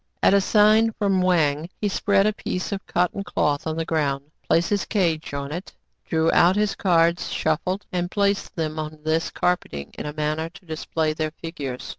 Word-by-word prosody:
33 - - +6
At - - +6
a 200 - +5
sign 215 +3 +4
from 195 -3 +1
Wang, 165 -3 +2
he 210 - 0
spread 200 0 +2
a 215 - +2
piece 185 -1 -4
of 200 -1 -3
cot 180 0 +1
ton 200 - -4
cloth 150 -5 0
on 160 0 -2
the 165 - -1
ground, 145 -3 -1 0.2
placed 170 +4 +3
his 205 -1 +1
cage 170 -7 0
on 140 0 -4
it, 175 +5 -6 0.3
drew 160 0 +2
out 175 +2 +5
his 210 -1 +1
cards, 170 -2 +2
shuffled, 180 +5 -1
and 175 -1 -1
placed 200 0 0
them 155 -1 -2
on 155 0 -5
this 160 +1 0
carpeting 75 - -2
in - - -4
a 150 - -5
manner 155 +1 -2
to 175 - -16
display 160 -1 -2
their 155 0 -2
figures. 140 -6 -5
165 Hz, 200 wpm, -23 LUFS, 155-195 Hz, 0.3 s, 33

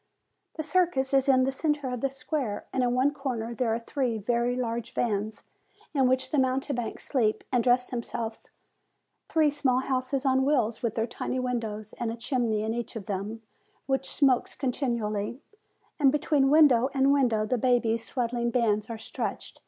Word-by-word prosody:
The 315 - -3
circus 295 -5 +1
is 270 0 +3
in 260 -1 +5
the 265 - +1
centre 295 0 -1
of 250 -2 -3
the 275 - +1
square; 260 -5 -3
and 260 - +1
in 245 -1 +1
one 270 +3 +3
corner 245 -5 -3
there 235 -1 0
are 225 - +1
three 240 -1 -2
very 235 +3 0
large 235 -2 -3
vans 215 -2 -1 0.5
in 270 -3 +3
which 260 +1 +1
the 300 - +2
mountebanks 260 -2 -1
sleep 220 -5 +1
and 245 -3 +2
dress 250 +1 +2
themselves, 230 -2 -5 0.8
three 310 -2 +3
small 275 -4 +1
houses 265 +1 -1
on 265 0 +3
wheels, 245 -6 +1
with 230 -3 -1
their 225 - +1
tiny 250 +2 -4
windows, 225 -4 -3
and 230 -1 -1
a - - -4
chimney 230 -3 -1
in 220 +1 -1
each 235 0 -5
of 215 -4 -6
them, 205 +4 -4 0.4
which 270 0 -1
smokes 270 -4 +2
continually; 235 -4 -2 0.6
and 275 -3 +5
between 290 -2 +2
window 275 -5 +6
and 270 +1 +4
window 235 -6 +2
the 245 +3 0
baby's 230 -2 +2
swaddling 240 -2 -1
bands 220 -3 +1
are 230 - -4
stretched. 220 - -5
250 Hz, 175 wpm, -27 LUFS, 230-270 Hz, 0.8 s, window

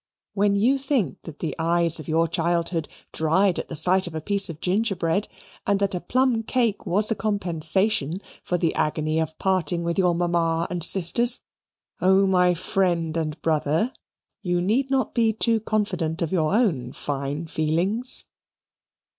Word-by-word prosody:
When 200 0 +1
you 250 +7 +2
think 260 - -1
that 160 -3 -9
the 160 - -4
eyes 170 0 +3
of 155 - -9
your 165 +1 +1
childhood 170 -1 -1 0.3
dried 175 +4 +1
at - - -6
the 165 - -5
sight 180 +4 +3
of 165 - -8
a - - -2
piece 200 +4 +2
of 160 -2 -8
gingerbread, 195 -1 0 0.4
and 200 -1 +2
that 200 -1 +2
a 180 - -2
plum 245 +5 +1
cake 230 -2 -1
was 210 +5 +1
a - - +1
compensation 190 -3 0 0.2
for 180 - -2
the 165 -2 0
agony 155 +1 -1
of 160 0 -3
parting 180 -3 0
with 170 +2 -2
your 180 -2 +2
mamma 170 -1 0
and 175 -2 -1
sisters, 200 +8 +4 0.6
oh 190 +1 +4
my 180 -2 +3
friend 170 -2 -1
and 155 -1 -3
brother, 160 - 0 0.5
you 175 -3 -1
need 230 +10 0
not 265 -1 0
be 225 -2 +2
too 225 +1 +1
confident 185 -7 -2
of 165 - -3
your 160 -5 +1
own 155 - 0
fine 140 +2 -4
feelings. 170 +10 0
175 Hz, 165 wpm, -23 LUFS, 165-205 Hz, 0.6 s, sisters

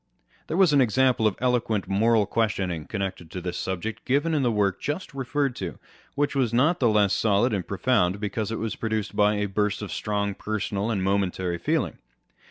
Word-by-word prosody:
There 165 - -2
was 185 -6 +5
an 140 - +5
example 125 -1 +3
of 105 - 0
eloquent 120 -5 0
moral 110 +1 +3
reasoning 95 -8 0
con 100 - -4
nected 95 -4 -5
with 90 - -4
this 90 -1 -3
subject, 95 +4 -4
given 145 +5 +1
in 150 - +2
the 125 -3 +2
work 100 -3 0
just 150 +4 -4
referred 135 0 -1
to, - - -5 0.4
which 145 0 0
was 130 -5 +1
not 145 +9 +3
the 120 - +3
less 105 -2 +3
solid 110 +3 +2
and 95 -4 -2
profound 100 -3 +1
because 105 +1 -3
it 115 - -2
was 115 -1 -3
produced 110 -2 -3
by 105 0 +3
a 105 0 0
burst 105 +1 -1
of 105 - -6
strong 100 -1 -1
personal 105 0 -3
and 100 -5 -1
momentary 95 -3 0
feeling. - - -1
105 Hz, 195 wpm, -25 LUFS, 100-125 Hz, 0.4 s, was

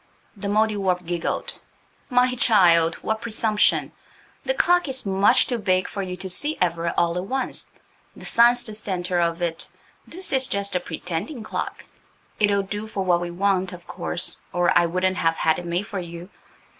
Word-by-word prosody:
The 200 0 -5
Mouldiwarp 200 -4 +1
giggled. 170 0 -2 0.5
"My 250 0 +3
child, 175 -9 +5
what 220 0 -1
presumption! 220 -2 +1 0.5
The - - 0
clock 355 -5 +3
is 265 -2 -4
much 200 +6 +4
too 245 -2 -2
big 185 -3 +1
for 200 - -5
you 180 -1 -5
to 190 - -5
see 295 - 0
ever–all 170 0 +1
at 180 - -4
once. 260 +4 -3 0.4
The - - -11
sun's 240 +1 +4
the 215 - -8
centre 185 -4 -2
of 170 0 0
it. 165 -1 -3 0.4
This 365 -3 -5
is 265 -1 +4
just 200 -1 -2
a - - +3
pretending 175 - -5
clock. - - -5 0.5
It'll 205 -1 +3
do 205 +2 -5
for 200 -3 -3
what 175 -1 +3
we 175 - -3
want, 185 +1 0
of 175 -1 -11
course, 175 - -3
or 175 0 +2
I 170 - +5
wouldn't 185 +2 0
have 165 -1 +2
had 160 -1 +1
it 175 - -7
made 175 +4 -1
for 200 -1 -5
you. 170 +2 -8
190 Hz, 175 wpm, -23 LUFS, 175-220 Hz, 0.5 s, child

